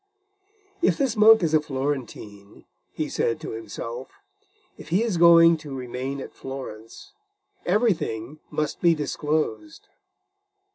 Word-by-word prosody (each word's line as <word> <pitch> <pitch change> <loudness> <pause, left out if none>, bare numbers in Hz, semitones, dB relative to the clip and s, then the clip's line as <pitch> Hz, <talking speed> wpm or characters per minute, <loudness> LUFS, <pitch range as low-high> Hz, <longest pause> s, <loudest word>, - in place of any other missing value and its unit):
"If 345 - +2
this 270 -5 0
monk 220 -1 +7
is 160 -2 0
a 155 - +5
Florentine," 130 -8 -5 0.3
he - - -3
said 115 - -1
to - - -6
himself; 115 +2 -7 0.7
"if - - -13
he 185 +7 +2
is 220 -7 -1
going 165 0 +7
to 150 -3 -8
remain 130 +2 -5
at - - -8
Florence, 125 -5 -9 0.5
everything 165 - 0
must 150 -1 -3
be 170 -2 +4
disclosed." 155 - -3
150 Hz, 125 wpm, -24 LUFS, 130-170 Hz, 0.7 s, monk